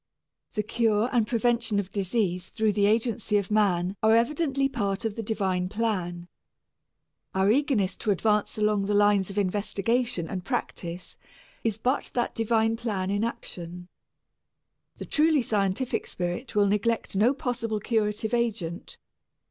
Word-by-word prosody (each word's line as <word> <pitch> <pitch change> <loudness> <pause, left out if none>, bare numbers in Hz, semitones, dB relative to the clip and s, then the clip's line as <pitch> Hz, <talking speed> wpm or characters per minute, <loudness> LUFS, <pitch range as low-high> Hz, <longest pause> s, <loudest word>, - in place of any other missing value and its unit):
The 210 - -1
cure 220 +1 +1
and 235 -4 +2
prevention 235 -2 +1
of 195 -1 -4
disease 190 -2 -1
through 220 -2 +1
the 200 0 +3
agency 220 -1 +1
of 200 0 -2
man 190 -3 +2
are 220 +1 +5
evidently 275 +3 +1
part 205 -5 -2
of 220 - -1
the 225 - -3
divine 190 -4 -1
plan. 185 -6 -2 1.1
Our 190 +2 +4
eagerness 230 -8 +1
to - - -3
advance 210 +2 +1
along 210 -2 +1
the 205 - +1
lines 205 -2 +4
of 195 - -7
investigation 205 0 0
and 185 0 -4
practice 180 -6 -4 0.5
is 220 -2 0
but 255 +5 0
that 240 - 0
divine 225 0 +1
plan 200 -5 -2
in 205 +2 0
action. 175 -6 -6 1.1
The - - -6
truly 310 -3 +3
scientific 210 +3 -1
spirit 180 +8 -4
will 205 -1 +5
neglect 210 +2 0
no 215 +6 +4
possible 235 -5 -2
curative 215 0 -1
agent. 215 -8 -2
210 Hz, 140 wpm, -27 LUFS, 195-230 Hz, 1.1 s, are